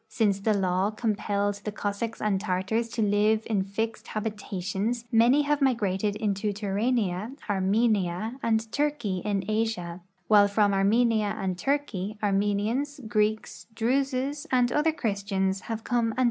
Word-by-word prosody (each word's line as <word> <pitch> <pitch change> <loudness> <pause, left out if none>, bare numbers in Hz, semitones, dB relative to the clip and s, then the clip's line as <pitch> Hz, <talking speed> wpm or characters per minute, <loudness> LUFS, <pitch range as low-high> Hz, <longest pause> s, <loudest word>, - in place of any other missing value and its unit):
Since 205 -3 +1
the 215 +1 +1
law 190 0 +1
compelled 205 -2 -1
the 210 - -3
Cossacks 205 +2 -3
and 200 -3 0
Tartars 215 +4 -1
to 225 -1 -1
live 210 +2 +2
in 210 -4 0
fixed 220 +3 -4
habitations 210 +1 -3
many 240 +5 +5
have 295 0 0
migrated 210 -6 +1
intoTurania, 210 +2 -1
Armenia, 205 +2 +1
and 220 -1 0
Turkey 285 -11 -1
in 200 -2 -1
Asia, 215 -6 -2 0.3
while 205 -1 +6
from 205 0 +2
Armenia 215 +1 +2
and 190 -1 -1
Turkey 215 -4 -2
Armenians, 210 +8 0
Greeks, 215 0 -1
Druses, 270 +5 0
and 250 -2 +3
other 300 +2 +2
Christians 200 -7 -1
have 225 -1 -3
come 230 -2 0
and.' - - -1
215 Hz, 130 wpm, -27 LUFS, 200-230 Hz, 0.3 s, while